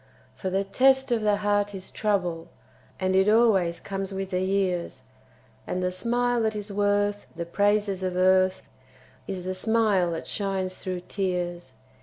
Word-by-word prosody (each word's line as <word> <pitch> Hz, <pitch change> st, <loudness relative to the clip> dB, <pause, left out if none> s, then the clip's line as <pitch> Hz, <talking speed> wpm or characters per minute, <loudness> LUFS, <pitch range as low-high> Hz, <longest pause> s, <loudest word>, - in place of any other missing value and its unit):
For 190 Hz, -, -4 dB
the 195 Hz, +1 st, 0 dB
test 265 Hz, +6 st, +3 dB
of 235 Hz, -2 st, +2 dB
the 210 Hz, -1 st, +3 dB
heart 205 Hz, 0 st, +1 dB
is 190 Hz, -1 st, -8 dB
trouble, 180 Hz, -6 st, -1 dB, 0.5 s
And 185 Hz, 0 st, +1 dB
it 190 Hz, +2 st, +4 dB
always 205 Hz, -7 st, +3 dB
comes 195 Hz, 0 st, -5 dB
with 195 Hz, 0 st, -4 dB
the 180 Hz, 0 st, 0 dB
years, 185 Hz, -2 st, -1 dB, 0.6 s
And 185 Hz, -, -2 dB
the 180 Hz, -, 0 dB
smile 240 Hz, +5 st, 0 dB
that 220 Hz, -1 st, 0 dB
is 210 Hz, 0 st, -5 dB
worth 205 Hz, 0 st, 0 dB
the 170 Hz, 0 st, -4 dB
praises 205 Hz, +1 st, +1 dB
of 185 Hz, -1 st, -2 dB
earth 185 Hz, 0 st, +3 dB, 0.6 s
Is 185 Hz, -2 st, -4 dB
the 185 Hz, +1 st, -3 dB
smile 205 Hz, -3 st, +2 dB
that 165 Hz, -, -5 dB
shines 195 Hz, -2 st, -2 dB
through 185 Hz, -1 st, -5 dB
tears. 175 Hz, -5 st, -3 dB
195 Hz, 160 wpm, -26 LUFS, 185-205 Hz, 0.6 s, it